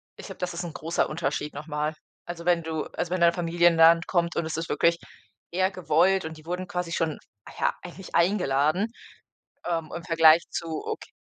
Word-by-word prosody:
ich - - -10
glaube, - - -9
das 180 -1 -3
ist 170 +1 -4
'n 170 - -6
großer 165 +3 -1
Unterschied 150 -1 -3
noch 145 +2 -7
mal. 150 0 -2 0.3
Also, 170 -1 -7
wenn 175 -1 +3
du 160 -1 -3
also, 175 - -3
wenn 185 - 0
deine 170 0 +5
Familie 175 0 +2
in - - -1
'n - - -3
Land 165 +1 +6
kommt 170 -1 0
und 170 - 0
es 160 - -3
ist 165 0 -4
wirklich 170 0 +2 0.5
eher 185 +2 +1
gewollt 185 +1 +2
und 160 0 -7
die 155 - -16
wurden 180 +2 -4
quasi 180 -2 -3
schon, 160 -3 -1 0.4
ja, - - +2
eigentlich 180 +1 -10
eingeladen, 170 0 +2 0.8
ähm, 165 -2 -2
im 170 - -6
Vergleich 165 -1 +5
zu, 170 - -3 0.2
okay - - -6
170 Hz, 210 wpm, -26 LUFS, 160-175 Hz, 0.8 s, Land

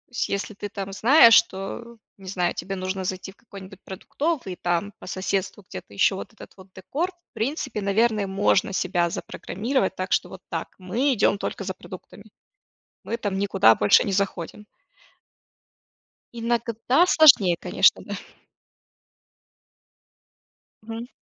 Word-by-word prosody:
есть - - -1
если 200 +2 -3
ты 205 0 -7
там 195 -1 -6
знаешь, 230 +4 +6
что, 230 +3 +1 0.2
не 195 -1 -14
знаю, 180 -2 -1
тебе 195 - -5
нужно 190 0 -4
зайти 185 +1 -4
в - - -24
какой-нибудь 195 -4 -13
продуктовый 260 - -3
и - - -9
там 175 +4 -2
по - - -12
соседству 190 +2 -3
где-то 95 +2 -10
еще 100 - +2
вот 195 - -8
этот 220 - -14
вот 190 0 -14
декор, 300 - -3
в 350 -1 -41
принципе, 250 -2 -3
наверное, 210 +1 +1
можно 195 0 +1
себя 175 -2 0
запрограммировать, 210 +5 -3
так 185 +1 -5
что - - +1
вот 190 - -11
так. 165 -2 -5
Мы 230 +10 0
идем 205 -3 +2
только 200 - -4
за 190 0 -4
продуктами, 190 +3 -12 0.8
мы 230 - -3
там 205 -4 -3
никуда 195 - +4
больше 105 - +4
не 200 - -3
заходим. 195 0 -3 1.7
Иногда 235 +5 +1
сложнее, 260 - +6
конечно, - - +3
да. - - -5 2.7
Мгм. 225 +2 -7
200 Hz, 140 wpm, -24 LUFS, 190-230 Hz, 2.7 s, знаешь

